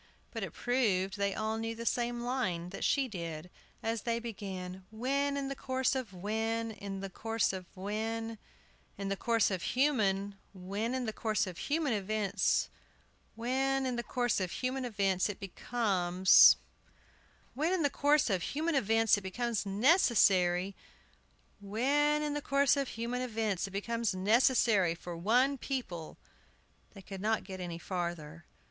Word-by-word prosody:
But -, -, -5 dB
it -, -, -5 dB
proved 200 Hz, -7 st, +1 dB
they 200 Hz, -1 st, -1 dB
all 220 Hz, +1 st, -2 dB
knew 225 Hz, 0 st, -3 dB
the 230 Hz, +1 st, -7 dB
same 240 Hz, 0 st, 0 dB
line 230 Hz, -9 st, -2 dB
that -, -, -6 dB
she 275 Hz, -2 st, +2 dB
did, 170 Hz, -5 st, -6 dB, 0.3 s
as 225 Hz, 0 st, -1 dB
they 230 Hz, -1 st, -1 dB
began: 190 Hz, -5 st, -6 dB
"When, 275 Hz, +5 st, -1 dB
in 275 Hz, -1 st, -2 dB
the 275 Hz, -, -4 dB
course 260 Hz, -1 st, 0 dB
of 260 Hz, -6 st, -3 dB
when, 220 Hz, +4 st, -2 dB
in 200 Hz, -2 st, -6 dB
the 195 Hz, -, -5 dB
course 225 Hz, +1 st, 0 dB
of 185 Hz, -2 st, -6 dB
when, 220 Hz, +3 st, -3 dB, 0.6 s
in 195 Hz, -1 st, -3 dB
the 195 Hz, -, 0 dB
course 230 Hz, 0 st, +2 dB
of 185 Hz, -2 st, -2 dB
human 205 Hz, -8 st, +1 dB, 0.2 s
when 200 Hz, +6 st, -3 dB
in 255 Hz, -1 st, -2 dB
the 220 Hz, -, -3 dB
course 215 Hz, -1 st, 0 dB
of 180 Hz, -3 st, -7 dB
human 295 Hz, -3 st, 0 dB
events 210 Hz, 0 st, +1 dB, 0.7 s
when, 265 Hz, +3 st, 0 dB
in 255 Hz, -1 st, -1 dB
the 240 Hz, -, -1 dB
course 245 Hz, -2 st, 0 dB
of 185 Hz, -2 st, -1 dB
human 255 Hz, 0 st, -2 dB
events, 195 Hz, -4 st, +1 dB
it 205 Hz, -, -5 dB
becomes 190 Hz, -3 st, +4 dB, 1.0 s
when, 310 Hz, +6 st, 0 dB
in 370 Hz, -4 st, +1 dB
the 285 Hz, -, +3 dB
course 290 Hz, -4 st, +3 dB
of 185 Hz, -2 st, +1 dB
human 315 Hz, -, -1 dB
events, 225 Hz, -4 st, +3 dB
it -, -, -14 dB
becomes 220 Hz, +3 st, -2 dB
necessary 195 Hz, -, +3 dB, 0.8 s
when, 285 Hz, +9 st, +1 dB
in 295 Hz, -1 st, -1 dB
the 295 Hz, -, -2 dB
course 275 Hz, -1 st, +3 dB
of 280 Hz, -1 st, -1 dB
human 235 Hz, +2 st, -3 dB
events 220 Hz, -6 st, -1 dB
it -, -, -8 dB
becomes 230 Hz, +1 st, -1 dB
necessary 210 Hz, -3 st, +3 dB
for 175 Hz, 0 st, -7 dB
one 250 Hz, +10 st, +2 dB
people" 185 Hz, -, -5 dB, 0.8 s
They 195 Hz, -, -11 dB
could 190 Hz, 0 st, -8 dB
not 220 Hz, +2 st, +1 dB
get 190 Hz, -1 st, -8 dB
any 175 Hz, -2 st, -5 dB
farther. 170 Hz, -2 st, -5 dB
220 Hz, 160 wpm, -32 LUFS, 190-250 Hz, 1.0 s, becomes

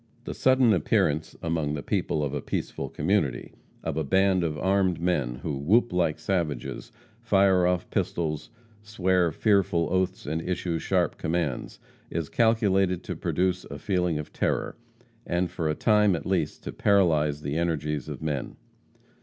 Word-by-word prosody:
The -, -, -5 dB
sudden 130 Hz, -3 st, +4 dB
appearance 80 Hz, -2 st, +1 dB
among 80 Hz, -3 st, -1 dB
the 70 Hz, -, -5 dB
people 75 Hz, -, -1 dB
of 70 Hz, -1 st, -2 dB
a 70 Hz, -, -2 dB
peaceful -, -, -4 dB
community 80 Hz, -12 st, -1 dB, 0.3 s
of -, -, -3 dB
a 80 Hz, -, 0 dB
band 95 Hz, +4 st, +2 dB
of 75 Hz, -2 st, -2 dB
armed 95 Hz, 0 st, +1 dB
men, 75 Hz, -9 st, 0 dB
who 75 Hz, -3 st, -2 dB
whoop 100 Hz, -, +2 dB
like 85 Hz, -4 st, +1 dB
savages, 85 Hz, +4 st, -3 dB, 0.3 s
fire 95 Hz, -5 st, +4 dB
off 90 Hz, 0 st, 0 dB
pistols, 75 Hz, -3 st, -2 dB, 0.3 s
swear 95 Hz, -5 st, +1 dB
fearful 95 Hz, -3 st, +2 dB
oaths, 95 Hz, 0 st, 0 dB
and 80 Hz, +3 st, -2 dB
issue 85 Hz, -1 st, -2 dB
sharp 90 Hz, -3 st, 0 dB
commands, 80 Hz, -4 st, -2 dB, 0.3 s
is 80 Hz, -2 st, -3 dB
calculated 95 Hz, -6 st, +2 dB
to -, -, -5 dB
produce 90 Hz, 0 st, 0 dB
a -, -, -8 dB
feeling 90 Hz, -5 st, 0 dB
of 75 Hz, -, -7 dB
terror, -, -, -1 dB, 0.5 s
and, 90 Hz, 0 st, 0 dB
for 80 Hz, -2 st, -2 dB
a 75 Hz, -, 0 dB
time 105 Hz, -2 st, +3 dB
at 80 Hz, -, -5 dB
least, 85 Hz, -6 st, -1 dB
to -, -, -5 dB
paralyze 75 Hz, -7 st, +2 dB
the 70 Hz, +1 st, -3 dB
energies 75 Hz, -4 st, -1 dB
of -, -, -7 dB
men. 75 Hz, -4 st, -3 dB
85 Hz, 155 wpm, -26 LUFS, 75-95 Hz, 0.5 s, sudden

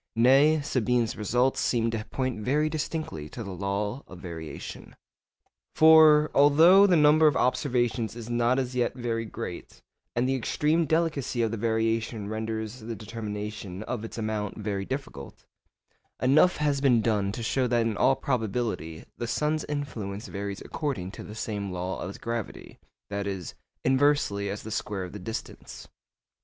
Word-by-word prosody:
Nay, 135 Hz, +6 st, +5 dB
Sabine's 125 Hz, -4 st, 0 dB
results 125 Hz, +5 st, +1 dB
seem 115 Hz, -2 st, +1 dB
to 110 Hz, -1 st, -3 dB
point 130 Hz, -4 st, -3 dB
very 150 Hz, +7 st, +1 dB
distinctly 155 Hz, -, -4 dB
to 115 Hz, -, -7 dB
the 100 Hz, -, -7 dB
law 100 Hz, +6 st, -3 dB
of 95 Hz, -, -11 dB
variation. 85 Hz, -3 st, -8 dB, 0.8 s
For, 155 Hz, -1 st, +7 dB
although 165 Hz, +8 st, +7 dB
the 180 Hz, -, +4 dB
number 155 Hz, 0 st, +6 dB
of 150 Hz, -, +3 dB
observations 120 Hz, -4 st, 0 dB
is 115 Hz, -2 st, -8 dB
not 120 Hz, +1 st, +1 dB
as 130 Hz, -1 st, -2 dB
yet 120 Hz, -1 st, 0 dB
very 115 Hz, -2 st, -2 dB
great 100 Hz, -, -7 dB, 0.4 s
and 120 Hz, +2 st, +1 dB
the 135 Hz, -, +1 dB
extreme 150 Hz, +6 st, +1 dB
delicacy 150 Hz, -6 st, 0 dB
of 110 Hz, -, 0 dB
the 115 Hz, -, -3 dB
variation 110 Hz, -1 st, -1 dB
renders 110 Hz, +1 st, -4 dB
the 115 Hz, 0 st, -6 dB
determination 105 Hz, -3 st, -6 dB
of 115 Hz, -1 st, -4 dB
its 115 Hz, -, -7 dB
amount 110 Hz, -2 st, -3 dB
very 100 Hz, -2 st, -3 dB
difficult, 130 Hz, -, -7 dB, 0.7 s
enough 155 Hz, +8 st, +4 dB
has 145 Hz, -2 st, 0 dB
been 125 Hz, -5 st, +4 dB
done 105 Hz, -3 st, +1 dB
to 115 Hz, -, -5 dB
show 130 Hz, +3 st, +1 dB
that 120 Hz, -1 st, +2 dB
in 115 Hz, -2 st, -1 dB
all 135 Hz, +6 st, +3 dB
probability 110 Hz, -, -2 dB
the 120 Hz, -, -2 dB
sun's 150 Hz, +4 st, 0 dB
influence 115 Hz, -8 st, -4 dB
varies 100 Hz, 0 st, -5 dB
according 130 Hz, -, -4 dB
to -, -, -9 dB
the 105 Hz, -, -9 dB
same 100 Hz, -3 st, -4 dB
law 90 Hz, +1 st, -4 dB
as 100 Hz, -, -8 dB
gravity—that 105 Hz, -3 st, -6 dB
is, 95 Hz, -5 st, -5 dB, 0.3 s
inversely 130 Hz, -7 st, +2 dB
as 100 Hz, +1 st, -5 dB
the 110 Hz, -, -7 dB
square 100 Hz, -2 st, -3 dB
of 90 Hz, -, -8 dB
the 105 Hz, -, -7 dB
distance. 110 Hz, +5 st, -7 dB
115 Hz, 155 wpm, -27 LUFS, 105-135 Hz, 0.8 s, For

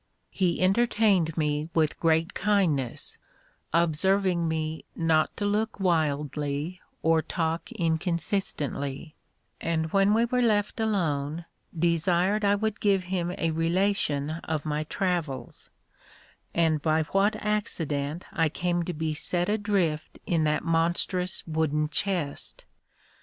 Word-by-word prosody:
He 180 Hz, -4 st, 0 dB
entertained 195 Hz, -5 st, +3 dB
me 150 Hz, 0 st, 0 dB
with 155 Hz, -2 st, +1 dB
great 165 Hz, +2 st, +2 dB
kindness, 175 Hz, -, 0 dB, 0.5 s
observing 170 Hz, +2 st, +2 dB
me 160 Hz, 0 st, -2 dB
not 160 Hz, -1 st, +2 dB
to 205 Hz, -, -1 dB
look 210 Hz, +1 st, 0 dB
wildly 150 Hz, -1 st, -1 dB, 0.2 s
or 160 Hz, 0 st, +4 dB
talk 165 Hz, 0 st, -2 dB
inconsistently; 160 Hz, -4 st, -2 dB, 0.5 s
and 160 Hz, -1 st, -1 dB
when 195 Hz, +1 st, +4 dB
we 230 Hz, +1 st, +4 dB
were 250 Hz, +1 st, +1 dB
left 210 Hz, -2 st, +1 dB
alone, 165 Hz, -7 st, -1 dB, 0.3 s
desired 175 Hz, +5 st, +2 dB
I 200 Hz, 0 st, +4 dB
would 215 Hz, 0 st, -2 dB
give 195 Hz, -3 st, +2 dB
him 175 Hz, -1 st, -1 dB
a 165 Hz, -, 0 dB
relation 165 Hz, -3 st, +1 dB
of 155 Hz, -2 st, -3 dB
my 150 Hz, 0 st, -1 dB
travels; 155 Hz, -9 st, -3 dB, 0.8 s
and 160 Hz, -3 st, +2 dB
by 155 Hz, +1 st, +2 dB
what 195 Hz, +6 st, +2 dB
accident 165 Hz, -8 st, -2 dB
I 165 Hz, -2 st, +2 dB
came 175 Hz, +2 st, -1 dB
to 180 Hz, -, -3 dB
be 155 Hz, 0 st, -2 dB
set 175 Hz, +4 st, -1 dB
adrift 200 Hz, -7 st, 0 dB
in 165 Hz, -3 st, +1 dB
that 150 Hz, 0 st, +1 dB
monstrous 175 Hz, +2 st, 0 dB
wooden 155 Hz, -2 st, 0 dB
chest. 175 Hz, -6 st, -2 dB
165 Hz, 120 wpm, -27 LUFS, 155-195 Hz, 0.8 s, or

